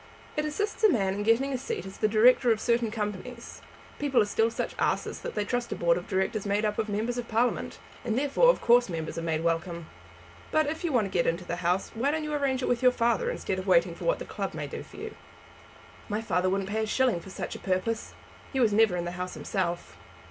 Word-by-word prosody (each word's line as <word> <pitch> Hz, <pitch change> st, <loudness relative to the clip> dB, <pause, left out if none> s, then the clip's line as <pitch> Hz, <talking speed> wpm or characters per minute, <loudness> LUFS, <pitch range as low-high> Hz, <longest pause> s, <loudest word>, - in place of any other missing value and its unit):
It 300 Hz, -, 0 dB
assists 415 Hz, +9 st, -3 dB
a 435 Hz, -, +8 dB
man 195 Hz, -, +1 dB
in 205 Hz, -, -3 dB
getting 230 Hz, +6 st, +2 dB
a 255 Hz, -, -1 dB
seat 220 Hz, -7 st, -4 dB
as 190 Hz, -, -9 dB
the 215 Hz, -, +3 dB
director 235 Hz, +3 st, +5 dB
of 220 Hz, -, +2 dB
certain 235 Hz, 0 st, +1 dB
Companies. 215 Hz, +2 st, -5 dB, 0.4 s
People 285 Hz, -3 st, +2 dB
are -, -, +4 dB
still 225 Hz, +2 st, +2 dB
such 230 Hz, -, -3 dB
asses -, -, 0 dB
that -, -, -6 dB
they 210 Hz, -1 st, 0 dB
trust 245 Hz, +2 st, -2 dB
a -, -, -1 dB
Board 170 Hz, 0 st, +3 dB
of 175 Hz, -, -5 dB
Directors 190 Hz, +2 st, 0 dB
made 205 Hz, +1 st, 0 dB
up 210 Hz, 0 st, -1 dB
of 220 Hz, -1 st, -1 dB
members 225 Hz, +4 st, -1 dB
of 235 Hz, -, -5 dB
Parliament, 230 Hz, +3 st, 0 dB, 0.3 s
and 225 Hz, -, -1 dB
therefore 290 Hz, -, +4 dB
of -, -, +3 dB
course 240 Hz, -1 st, +5 dB
members 160 Hz, -1 st, -4 dB
are -, -, -3 dB
made 165 Hz, -1 st, -1 dB
welcome. 170 Hz, 0 st, -1 dB, 0.6 s
But 310 Hz, 0 st, +2 dB
if 315 Hz, +4 st, -4 dB
you 340 Hz, -, 0 dB
want 240 Hz, -6 st, +3 dB
to 195 Hz, -, -6 dB
get 175 Hz, -3 st, +1 dB
into 170 Hz, +2 st, -1 dB
the 175 Hz, -, -3 dB
House 180 Hz, +2 st, 0 dB
why 245 Hz, +5 st, 0 dB
don't 310 Hz, +1 st, -1 dB
you 300 Hz, 0 st, -3 dB
arrange 275 Hz, -3 st, 0 dB
it -, -, 0 dB
with 245 Hz, 0 st, +1 dB
your 250 Hz, -1 st, +6 dB
father, 250 Hz, -, +1 dB
instead -, -, -2 dB
of -, -, -6 dB
waiting -, -, +4 dB
for -, -, -8 dB
what -, -, +2 dB
the -, -, -7 dB
club -, -, -4 dB
may -, -, -3 dB
do -, -, -6 dB
for -, -, -13 dB
you?" -, -, -6 dB, 1.0 s
"My 210 Hz, +1 st, -1 dB
father 185 Hz, -4 st, 0 dB
wouldn't 195 Hz, +1 st, -1 dB
pay 220 Hz, +1 st, 0 dB
a 220 Hz, -, -1 dB
shilling 250 Hz, -5 st, +2 dB
for 180 Hz, -, -12 dB
such -, -, -5 dB
a -, -, -7 dB
purpose. 195 Hz, +5 st, -2 dB, 0.4 s
He 270 Hz, -, -1 dB
was 225 Hz, -5 st, +3 dB
never 210 Hz, -4 st, +4 dB
in 175 Hz, -, -2 dB
the 175 Hz, -, -3 dB
House 180 Hz, +1 st, -5 dB
himself." 175 Hz, -3 st, -3 dB
220 Hz, 250 wpm, -28 LUFS, 190-250 Hz, 1.0 s, a